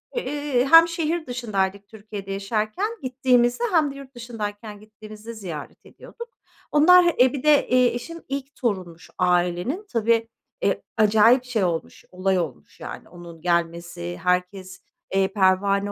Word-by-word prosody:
eee, 290 - -1
hem 330 0 +9
şehir 335 0 -2
dışındaydık, 200 -5 -2
Türkiye'de 205 -2 -9
yaşarken 215 - -2
gittiğimizde, 250 - +1
hem 310 -5 +2
de - - -11
yurt 275 -1 -12
dışındayken 215 -3 -7
gittiğimizde 215 +1 -11
ziyaret 175 -9 -8
ediyorduk. 470 0 -12 0.4
Onlar 350 +4 +6
e 255 0 +5
bir 275 - -5
de, 300 -1 +4
eee, 250 0 +4
eşim 335 +7 -7
ilk 275 +1 -5
torunmuş 185 -8 -4
ailenin. 180 - 0
Tabii, 230 0 +2 0.4
e - - +1 0.2
acayip 220 +4 +5
şey 240 -5 -1
olmuş, 170 -3 -3
olay 185 0 0
olmuş 155 -8 -7
yani - - -9
onun 170 -2 -12
gelmesi 170 - -2
herkes, 185 +1 -2 0.3
eee, 195 0 +3
pervane 200 +1 +2
215 Hz, 135 wpm, -23 LUFS, 190-260 Hz, 0.4 s, hem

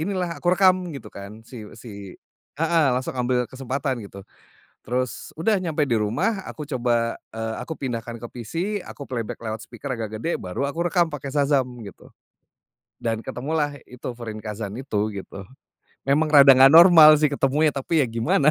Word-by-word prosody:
inilah 175 -3 -3
aku 175 - -1
rekam 185 -2 +3
gitu 125 -6 -9
kan 105 +3 -10
siw 110 -4 -11
si 100 -5 -10 0.4
heeh, 165 0 +2
langsung 130 +1 -3
ambil 125 0 +1
kesempatan 130 0 -3
gitu. 100 0 -12 0.6
Terus 125 -1 -3
udah 200 +7 +1
nyampe 160 -4 0
di 115 - +2
rumah 125 - -1
aku 150 - -7
coba, 120 -1 0 0.2
eee, 110 0 -4
aku - - -6
pindahkan 120 -3 -5
ke 120 - -6
PC, 120 +1 -10 0.3
aku 140 - -9
playback 115 -4 -5
lewat 110 -1 -5
speaker 140 - -9
agak 110 -1 -5
gede, 170 - -1
baru 95 +10 -3
aku 170 +4 -2
rekam 175 -3 +3
pakai 140 -3 -7
Shazam 140 -2 +2 0.2
gitu - - -16 0.9
dan 115 -1 -2
ketemulah 145 +2 -2
itu 125 0 -7
Fūrinkazan 110 -3 -6
itu, 110 -5 -2
gitu. 100 0 -8 0.7
Memang 150 +3 +2
rada 140 -2 +8
nggak 135 +1 +7
normal 165 -3 +9
sih 150 -2 +2
ketemunya 145 +2 +2
tapi 145 +3 +1
ya 130 - 0
gimana? 115 +6 +2
130 Hz, 165 wpm, -23 LUFS, 115-155 Hz, 0.9 s, normal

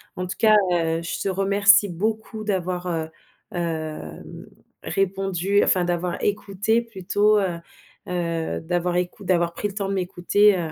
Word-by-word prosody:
En 180 - -3
tout 180 - -6
cas, 215 -1 +6 0.2
heu, 165 -1 +1
je 170 - -4
te - - -2
remercie 200 +2 +4
beaucoup 215 +4 -3
d'avoir, 180 -3 -2
heu, 160 -2 -2 0.4
hem, 160 - -5 0.4
répondu 195 0 0
enfin 185 - +2
d'avoir 175 0 -2
écouté 205 +2 0
plutôt, 210 -1 +1
heu 180 -4 -1 0.5
heu, 170 -2 -2
d'avoir 175 +1 -1
écou 180 +3 -2
d'avoir 175 -2 +1
pris 205 - -2
le 200 - -8
temps 200 -1 -3
de - - -1
m'écouter, 190 +2 +3
heu, 165 -3 -3
185 Hz, 150 wpm, -23 LUFS, 175-205 Hz, 0.5 s, cas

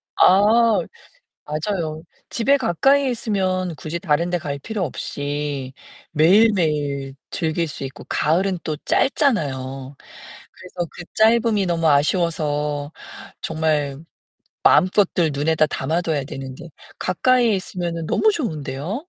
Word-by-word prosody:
아. 215 +4 +5 0.7
맞아요. 155 0 -3 0.3
집에 270 +4 +2
가까이에 270 - +2
있으면 185 -6 -1
굳이 160 +3 -5
다른 170 -1 0
데 175 - 0
갈 145 -3 -4
필요 205 +4 -3
없이 145 -3 -4 0.4
매일매일 155 -6 +2 0.2
즐길 165 0 -1
수 145 - -7
있고 135 - -8
가을은 180 +4 +1
또 155 -1 -3
짧잖아요. 240 - +1 1.0
그래서 180 -2 -6
그 175 - -9
짧음이 220 -2 +3
너무 165 -2 +1
아쉬워서 150 -2 0 0.5
정말 155 -3 -1 0.7
마음껏들 185 -3 +3
눈에다 155 +2 +2
담아둬야 160 -1 -1
되는데 135 +4 -8 0.3
가까이에 245 +3 +2
있으면은 170 -3 -4
너무 435 - +3
좋은데요. 155 - -4
170 Hz, 260 characters per minute, -21 LUFS, 150-200 Hz, 1.0 s, 아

